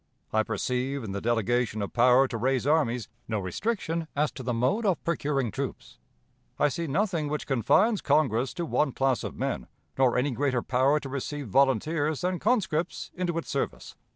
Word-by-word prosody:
I 110 - +4
perceive, 125 +4 -2
in 105 - -5
the 100 0 -4
delegation 120 0 0
of 100 - -6
power 125 +2 +5
to 125 - -6
raise 130 +3 0
armies, 125 -7 +1 0.2
no 110 - -1
restriction 165 - -2
as 150 +1 +1
to - - -8
the 125 -1 -2
mode 130 - +1
of 190 -6 +1
procuring 145 -7 0
troops. - - -6 0.6
I 150 - +3
see 165 +5 -3
nothing 165 0 0
which 150 0 -3
confines 185 - +3
Congress 130 -4 +2
to 170 - -2
one 150 -4 +1
class 135 -2 +1
of - - -5
men, - - -2 0.3
nor 130 -2 +4
any 135 +3 +1
greater 130 -1 0
power 130 +4 +2
to 145 - -7
receive 140 -1 -4
volunteers 145 - +2
than 180 0 -1
conscripts 190 -8 0
into 175 -2 -2
its 165 - -4
service. - - -3
135 Hz, 180 wpm, -27 LUFS, 125-160 Hz, 0.6 s, power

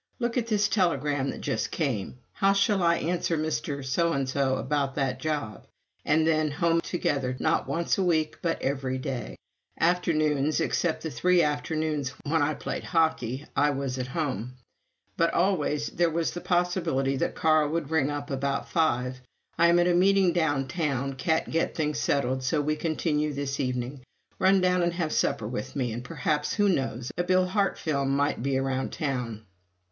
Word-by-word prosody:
"Look 235 0 -2
at 240 -3 0
this 210 -2 +2
telegram 145 -9 +1
that - - -6
just - - -1
came 130 - -1
in." - - -13 0.2
"How 195 0 +3
shall 200 0 +2
I 170 -1 +4
answer 170 0 -1
Mr. 150 -3 -2
's 135 -1 0
about 135 0 0
that 135 -3 -1
job?" 145 -7 -3 0.4
And 155 +1 +3
then 155 -1 +2
home 165 +2 +1
together; 135 -8 -1
not 160 - +1
once 170 +3 0
a - - +2
week, 160 -3 +1
but 165 -1 -1
every 135 -1 -1
day. 130 -1 -4 0.4
Afternoons, 155 -4 +2
except 170 -3 0
the 160 - -3
three 180 +1 +3
afternoons 150 -2 -1
when 160 +2 +1
I 145 +1 +1
played - - -4
hockey, 150 -6 0
I 145 +1 +3
was 135 -2 -2
at 125 - -2
home; 125 - -3 0.6
but 165 0 +2
always 155 -5 +1
there 170 0 +2
was 165 +1 -1
a 175 - -4
possibility 175 -7 0
that - - -1
Carl 155 -2 +3
would 160 -1 -2
ring 155 -3 +2
up 145 0 -4
about 135 0 -1
five. 125 -5 0 0.4
"I 170 - +6
am 170 +1 +5
at 175 0 +4
a 175 - +3
meeting 190 0 +4
down 145 -6 +1
town. 140 -3 -1
Can't 160 +5 0
get 165 +1 0
things 150 -3 -1
settled, 130 -3 0
so 135 +4 0
we 150 +1 0
continue 150 -1 -1
this 140 0 -3
evening. 125 0 -2 0.4
Run 190 0 +4
down 180 0 +3
and 170 0 +1
have 170 -3 -2
supper 105 - 0
with 120 +2 -5
me, 125 -5 -1
and 120 +2 -5
perhaps, 150 +2 -1
who 205 -2 +3
knows, 130 - -1
a - - +3
Bill 185 +1 +3
Hart 195 +2 0
film 140 -4 -1
might 145 -3 0
be 135 +1 0
around 135 0 -1
town!" 125 -7 -3
150 Hz, 180 wpm, -27 LUFS, 135-170 Hz, 0.6 s, I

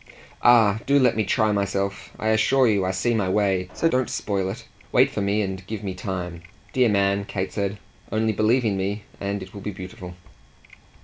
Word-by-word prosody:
"Ah 110 -4 +5
do 140 +1 +4
let 130 -3 +4
me 110 - +1
try 110 -1 +2
myself! 100 -1 -2
I 110 - -1
assure 120 +4 +4
you 100 -3 +2
I - - 0
see 95 +6 0
my 100 -5 0
way 95 -2 +1
so 165 - +2
don't 130 -5 +1
spoil 95 -2 -1
it: - - -7 0.3
wait - - +4
for - - -3
me 100 +2 +1
and 95 0 -4
give 110 -2 -5
me 95 -2 -3
time. 90 -2 -5 0.3
Dear 125 -3 +4
man," 100 -1 +2
Kate 95 -1 -4
said, 100 0 -2 0.3
"only 110 +1 +1
believe 115 +5 +2
in 100 -3 +1
me, 100 +2 -2 0.2
and 100 -1 -3
it 95 - -13
will 100 - -8
be 105 - -4
beautiful." 90 -2 -8
100 Hz, 200 wpm, -24 LUFS, 95-110 Hz, 0.3 s, Ah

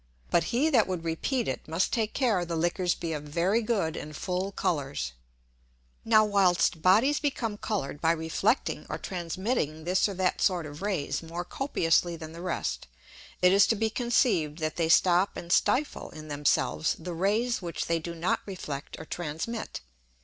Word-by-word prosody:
But 170 - +3
he 285 +7 +1
that 235 -7 +4
would 180 -3 -3
repeat 220 +10 -1
it, - - -4
must 165 +4 0
take 220 -2 0
care 225 -9 +2
the 170 -1 -3
Liquors 175 +2 +1
be 165 -2 -4
of 150 - -3
very 170 +9 +1
good 200 -8 0
and 150 0 -7
full 185 +2 -2
Colours. 140 - -2 0.9
Now, 215 -1 +5
whilst 180 -5 +2
Bodies 225 - +4
become 245 -7 -1
coloured 190 -9 -3
by 165 0 +4
reflecting 165 - 0
or - - -3
transmitting 175 - -2
this 185 +4 +2
or 200 - -5
that 185 0 0
sort 180 -4 +2
of 145 +2 -9
Rays 165 -8 -1
more 170 +1 -5
copiously 175 - +1
than 160 -1 -8
the 165 +1 -9
rest, 65 - -3 0.6
it 180 +1 +6
is 200 0 +6
to 225 - +2
be 220 +1 0
conceived 220 - +1
that 155 -2 -2
they 165 -2 0
stop 180 +3 +4
and 170 - -7
stifle 270 +9 +1
in 155 0 -10
themselves 145 - +1
the 175 +2 -6
Rays 210 +8 +1
which 170 -2 -3
they 165 0 0
do 170 +1 -6
not 170 +2 0
reflect 155 -7 -6
or 160 - -8
transmit. 175 - -4
175 Hz, 175 wpm, -28 LUFS, 160-210 Hz, 0.9 s, it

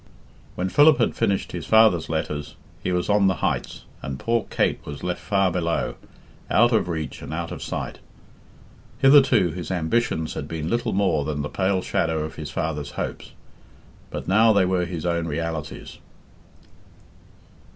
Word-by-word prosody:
When 90 - -1
Philip 145 +5 +6
had 120 - +1
finished 100 -1 0
his 85 -3 -6
father's 110 -7 +4
letters, 75 -1 -3 0.3
he 90 - -1
was 90 -1 0
on 100 -1 +4
the 95 - +2
heights, - - -2 0.2
and 65 -1 -5
poor 115 +7 0
Kate - - 0
was 70 -1 -8
left 90 -1 -3
far 95 -2 +1
below, 85 -1 -1 0.6
out 120 +2 +4
of 110 - +2
reach 80 -3 -4
and - - -7
out - - -4
of - - -6
sight. - - -5 1.0
Hitherto 135 - +5
his 85 -1 -6
ambitions 85 -1 0
had 70 - -5
been 80 +1 -4
little 120 - 0
more 95 -7 +2
than 75 0 -3
the 75 - -4
pale 95 -1 0
shadow 80 -5 0
of 80 0 -6
his 75 -2 -7
father's 75 0 -3
hopes, - - -6 0.8
but - - -6
now 110 +4 +5
they 100 -3 +4
were 90 -1 +1
his 85 -2 -5
own 85 -1 0
realities. 80 -1 -5
85 Hz, 160 wpm, -24 LUFS, 80-100 Hz, 1.0 s, Philip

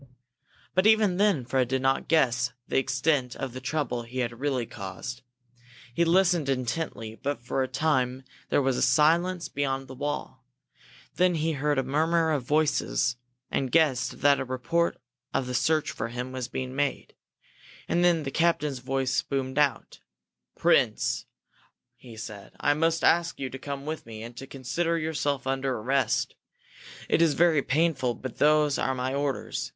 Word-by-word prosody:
But 185 +4 +3
even 215 -4 +4
then 195 - +2
Fred 130 0 +1
did 130 +1 -1
not 135 0 +1
guess 125 -6 +2
the - - +2
extent 130 -1 0
of 135 -3 -5
the 130 - -7
trouble 130 -4 -2
he 120 +2 -9
had 120 -2 -2
really 135 -4 0
caused. 100 +5 -7 0.7
He 170 - +2
listened 175 -3 +3
intently, 125 -3 -2
but 145 +1 -2
for 130 +2 -1
a 130 - 0
time 130 -2 0 0.3
there 145 - +2
was 130 -1 +1
silence 165 +6 +3
beyond 135 -1 -2
the 130 - -9
wall. 145 -1 -4 0.7
Then 180 -1 +3
he 160 +1 0
heard 145 0 0
a 135 - +2
murmur 160 +4 +1
of 145 -3 +1
voices, 135 - +1 0.3
and 130 -2 -1
guessed 150 -6 +2
that 140 0 +5
a - - -1
report 130 +7 0 0.4
of 135 - +1
the 125 - -4
search 155 +5 +1
for 115 - -4
him 125 +2 -5
was 130 -1 -4
being 130 0 -5
made. 140 -1 -2 0.7
And 175 - +1
then 170 -3 +3
the 135 - -4
captain's 150 -4 +1
voice 130 +1 0
boomed 135 0 -2
out. 145 -2 0 0.6
"Prince," - - +2 0.7
he 120 -3 -13
said, 105 -2 -8
"I 145 - +3
must 165 +2 +1
ask 170 0 +3
you 130 -2 -4
to 135 - -7
come 140 0 -6
with 155 -5 -5
me 110 -1 -8
and 120 +1 -9
to 135 - -8
consider 165 +6 -1
yourself 145 -4 -1
under 135 0 -1
arrest. 125 +1 0 0.7
It - - +2
is 165 -3 +4
very 165 -3 +4
painful 135 -5 +1
but 130 -3 -8
those 150 -1 +4
are 130 - 0
my 130 +1 -2
orders. 140 -1 -2
135 Hz, 165 wpm, -27 LUFS, 130-155 Hz, 0.7 s, that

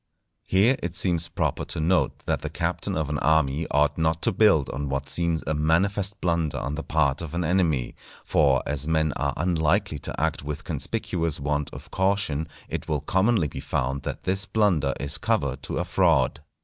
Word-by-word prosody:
Here 105 +8 +4
it 85 0 -4
seems 85 -2 +1
proper - - -1
to - - -5
note 85 +4 +1
that - - 0
the - - -4
captain - - -2
of 75 -2 -1
an 75 - -1
army 80 0 +2
ought 75 +2 +2
not 80 0 0
to 115 - +3
build 100 -8 +4
on 70 0 -4
what 70 0 -2
seems 85 -2 0
a 80 - 0
manifest 95 +6 +1
blunder 85 -3 0
on 70 - -3
the 80 - -3
part 75 -3 +1
of 85 -1 -6
an 90 - 0
enemy; 80 -7 +1 0.3
for 70 -4 +3
as 75 0 -2
men 80 -2 +1
are 70 0 -2
unlikely 80 0 +1
to - - -5
act 80 +2 0
with 75 0 -5
conspicuous 85 -3 -2
want 75 0 -1
of - - -11
caution, 95 -6 0 0.2
it - - -5
will 75 -3 -1
commonly 95 +3 +2
be - - -7
found 65 0 -2
that - - -5
this 95 +1 0
blunder 85 -11 +2
is 70 +1 -1
cover 70 -2 0
to 70 - -5
a 90 - -1
fraud. 85 -7 +2
80 Hz, 190 wpm, -25 LUFS, 75-90 Hz, 0.3 s, Here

